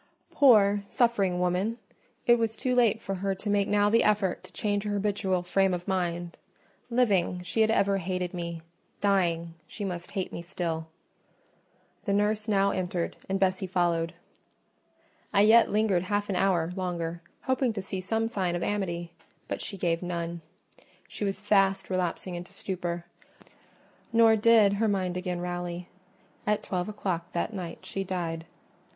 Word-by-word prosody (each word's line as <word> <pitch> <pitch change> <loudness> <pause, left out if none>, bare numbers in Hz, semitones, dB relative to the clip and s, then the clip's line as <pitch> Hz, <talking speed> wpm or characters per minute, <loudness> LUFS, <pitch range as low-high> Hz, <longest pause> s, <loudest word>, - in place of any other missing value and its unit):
Poor, 205 -7 +5
suffering 205 -8 +2
woman! 180 +6 0 0.5
it 240 0 +5
was 225 -1 -1
too 250 +3 0
late 235 -3 +4
for 195 - -4
her 195 +1 -1
to 205 +2 -3
make 200 -1 +2
now 205 0 +3
the 230 +2 +4
effort 205 -4 +1
to - - -14
change 205 -1 -1
her 210 -1 -2
habitual 200 -3 0
frame 190 +1 +2
of 175 0 -8
mind: 175 -2 -2 0.5
living, 200 -7 +2
she 180 +6 0
had 220 - +4
ever 200 -3 +2
hated 180 0 -3
me—dying, 170 0 -2
she 205 - -6
must 175 -2 -5
hate 190 -3 -3
me - - -4
still. 170 -2 -3 1.2
The 200 - +1
nurse 210 +1 +1
now 200 -2 +3
entered, 180 -2 -2
and 195 0 0
Bessie 190 0 +1
followed. 170 -2 0 1.2
I 200 - +4
yet 225 +2 +6
lingered 205 -4 +2
half 205 +2 -1
an 195 - 0
hour 180 -3 +2
longer, 170 -3 -3 0.2
hoping 260 -2 +1
to 200 - -3
see 190 -1 -4
some 225 +4 0
sign 190 -6 -1
of 175 - -2
amity: 175 -5 -2 0.4
but - - -3
she 200 - -5
gave 170 -2 0
none. 170 -1 -3 0.7
She - - -6
was 195 -1 -1
fast 195 -2 +2
relapsing 185 0 -1
into 175 +1 -7
stupor; 175 -2 -4 1.1
nor 230 -1 +6
did 220 -2 +5
her 220 +2 +1
mind 185 -3 0
again 180 -1 -3
rally: 175 0 -4 0.6
at 210 0 +1
twelve 180 +1 -2
o'clock 185 -5 -3
that 175 +6 -1
night 175 -4 -6
she 195 - -3
died. 170 -3 -3
190 Hz, 155 wpm, -28 LUFS, 175-205 Hz, 1.2 s, yet